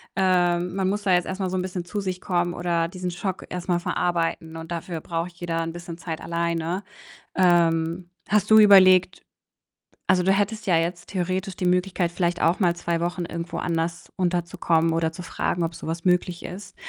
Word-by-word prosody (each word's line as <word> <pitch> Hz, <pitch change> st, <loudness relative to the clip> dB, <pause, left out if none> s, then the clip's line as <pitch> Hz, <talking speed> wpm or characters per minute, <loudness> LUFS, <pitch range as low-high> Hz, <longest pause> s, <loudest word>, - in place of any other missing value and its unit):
Ähm, 180 Hz, -2 st, +2 dB
man 190 Hz, -1 st, +1 dB
muss 205 Hz, +1 st, -2 dB
da 190 Hz, -, +3 dB
jetzt 180 Hz, -1 st, +3 dB
erst 190 Hz, +1 st, -4 dB
mal 190 Hz, -, 0 dB
so 185 Hz, -, -1 dB
'n -, -, 0 dB
bisschen 180 Hz, -1 st, -4 dB
zu 205 Hz, +4 st, -4 dB
sich 185 Hz, -1 st, -3 dB
kommen 175 Hz, -1 st, 0 dB
oder 170 Hz, -2 st, 0 dB
diesen 180 Hz, 0 st, -5 dB
Schock 185 Hz, +2 st, -4 dB
erst 180 Hz, 0 st, -5 dB
mal 175 Hz, -1 st, +2 dB
verarbeiten 165 Hz, -2 st, -1 dB
und 165 Hz, +1 st, -8 dB
dafür 170 Hz, -1 st, -4 dB
braucht 170 Hz, +1 st, -3 dB
jeder 170 Hz, -1 st, -3 dB
'n 165 Hz, 0 st, -4 dB
bisschen 170 Hz, -1 st, -8 dB
Zeit 165 Hz, -3 st, -5 dB
alleine. 170 Hz, +2 st, -2 dB, 0.5 s
Ähm, 170 Hz, -1 st, +2 dB, 0.2 s
hast 210 Hz, 0 st, +2 dB
du 220 Hz, -, +9 dB
überlegt 185 Hz, -3 st, +6 dB, 0.9 s
also, 180 Hz, -1 st, +3 dB
du 190 Hz, -, +3 dB
hättest 205 Hz, +2 st, -1 dB
ja 180 Hz, -, +3 dB
jetzt 170 Hz, +1 st, -1 dB
theoretisch 185 Hz, +1 st, -2 dB
die 180 Hz, -, -1 dB
Möglichkeit, 180 Hz, -1 st, +1 dB
vielleicht 175 Hz, 0 st, -1 dB
auch 170 Hz, +5 st, +3 dB
mal 175 Hz, -3 st, +2 dB
2 170 Hz, -1 st, -2 dB
Wochen 175 Hz, +1 st, -2 dB
irgendwo 170 Hz, +1 st, -5 dB
anders 165 Hz, 0 st, -2 dB
unterzukommen 175 Hz, -2 st, +1 dB
oder 165 Hz, 0 st, 0 dB
zu 175 Hz, +2 st, -9 dB
fragen, 175 Hz, 0 st, -2 dB
ob 165 Hz, 0 st, -3 dB
so -, -, -9 dB
was 165 Hz, +1 st, -4 dB
möglich 180 Hz, -1 st, +1 dB
ist. 185 Hz, +4 st, -9 dB
175 Hz, 195 wpm, -24 LUFS, 170-185 Hz, 0.9 s, du